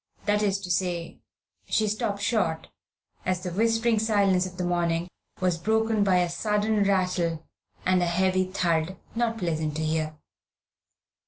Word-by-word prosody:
That 210 Hz, 0 st, +2 dB
is 200 Hz, -2 st, +1 dB
to 180 Hz, -2 st, -4 dB
say, 175 Hz, -1 st, -1 dB, 0.5 s
she 215 Hz, -, +1 dB
stopped 205 Hz, -1 st, -2 dB
short, 170 Hz, -9 st, 0 dB, 0.5 s
as 185 Hz, -1 st, -1 dB
the 180 Hz, -, -3 dB
whispering 225 Hz, +3 st, +2 dB
silence 200 Hz, -4 st, +2 dB
of 180 Hz, -1 st, -11 dB
the 180 Hz, -, -2 dB
morning 170 Hz, -1 st, 0 dB, 0.3 s
was 180 Hz, -2 st, +1 dB
broken 220 Hz, +2 st, +2 dB
by 190 Hz, -2 st, +3 dB
a 175 Hz, -, +1 dB
sudden 210 Hz, +3 st, 0 dB
rattle 180 Hz, -4 st, 0 dB, 0.4 s
and 185 Hz, 0 st, +3 dB
a 175 Hz, -, +1 dB
heavy 185 Hz, +2 st, +2 dB
thud, 175 Hz, -1 st, 0 dB, 0.2 s
not 230 Hz, -1 st, 0 dB
pleasant 160 Hz, -5 st, -2 dB
to 160 Hz, -, -2 dB
hear. 155 Hz, 0 st, -1 dB
185 Hz, 150 wpm, -26 LUFS, 170-210 Hz, 0.5 s, by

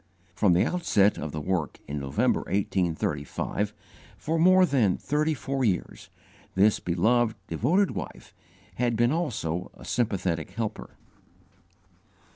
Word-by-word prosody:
From 95 Hz, 0 st, +3 dB
the 90 Hz, -, +3 dB
outset 105 Hz, -, +2 dB
of 75 Hz, 0 st, -4 dB
the 75 Hz, -, -4 dB
work 85 Hz, -1 st, -2 dB
in 75 Hz, +1 st, -3 dB
November, 70 Hz, -1 st, +1 dB
1835, 90 Hz, -5 st, -1 dB, 0.5 s
for 160 Hz, +2 st, -1 dB
more 185 Hz, +2 st, +6 dB
than 125 Hz, -, +2 dB
thirty 150 Hz, +1 st, 0 dB
four 135 Hz, 0 st, -2 dB
years, 100 Hz, -7 st, -2 dB, 0.5 s
this 100 Hz, +3 st, +4 dB
beloved, 110 Hz, +7 st, +1 dB
devoted 160 Hz, -, +1 dB
wife -, -, -7 dB, 0.4 s
had 120 Hz, -1 st, +1 dB
been 120 Hz, +2 st, +3 dB
also 100 Hz, -, -2 dB
a -, -, -13 dB
sympathetic 95 Hz, -9 st, -1 dB
helper. 110 Hz, -2 st, -4 dB
105 Hz, 120 wpm, -27 LUFS, 85-135 Hz, 0.5 s, more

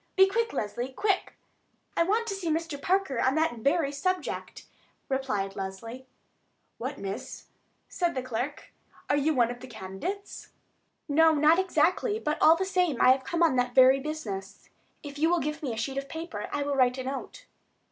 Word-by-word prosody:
"Be 385 Hz, -, +7 dB
quick, 460 Hz, +3 st, 0 dB
Leslie, 240 Hz, +5 st, -3 dB
quick." 390 Hz, +7 st, -1 dB, 0.6 s
"I -, -, +2 dB
want 425 Hz, +7 st, +2 dB
to 435 Hz, -, -3 dB
see 380 Hz, -4 st, -3 dB
Mr. 320 Hz, -2 st, -2 dB
Parker 370 Hz, -9 st, +1 dB
on 260 Hz, +2 st, +2 dB
that 315 Hz, -7 st, +1 dB
very 280 Hz, +4 st, +1 dB
subject," 370 Hz, +6 st, -3 dB, 0.4 s
replied 210 Hz, -8 st, -1 dB
Leslie. 225 Hz, +7 st, -7 dB, 0.7 s
"What, 265 Hz, +4 st, -4 dB
miss," 195 Hz, 0 st, -6 dB, 0.4 s
said 345 Hz, -4 st, -1 dB
the 260 Hz, -, -2 dB
clerk, 255 Hz, +3 st, -5 dB, 0.4 s
"are -, -, +4 dB
you 290 Hz, +2 st, +1 dB
one 240 Hz, -2 st, +3 dB
of 245 Hz, -, -8 dB
the 260 Hz, -, -10 dB
candidates?" 220 Hz, -, -6 dB, 0.6 s
"No, 320 Hz, +2 st, +5 dB
not 305 Hz, +4 st, +5 dB
exactly; 370 Hz, +5 st, +1 dB
but, 305 Hz, -8 st, -2 dB
all 320 Hz, -, +7 dB
the 380 Hz, +3 st, -1 dB
same, 360 Hz, -8 st, +1 dB
I 255 Hz, -, +7 dB
have 260 Hz, 0 st, +2 dB
come 340 Hz, +5 st, 0 dB
on 310 Hz, -6 st, +3 dB
that 250 Hz, 0 st, 0 dB
very 260 Hz, +1 st, +7 dB
business. 220 Hz, -11 st, -6 dB, 0.3 s
If 285 Hz, -1 st, -8 dB
you 320 Hz, +2 st, +3 dB
will 350 Hz, 0 st, +3 dB
give 300 Hz, 0 st, -3 dB
me 275 Hz, -5 st, -2 dB
a 225 Hz, -, -5 dB
sheet 270 Hz, +4 st, -2 dB
of 275 Hz, 0 st, -8 dB
paper 320 Hz, -11 st, -6 dB
I 290 Hz, -, -1 dB
will 285 Hz, 0 st, -1 dB
write 250 Hz, -1 st, +3 dB
a 260 Hz, -, -4 dB
note." 275 Hz, -, -6 dB
285 Hz, 185 wpm, -28 LUFS, 255-335 Hz, 0.7 s, Be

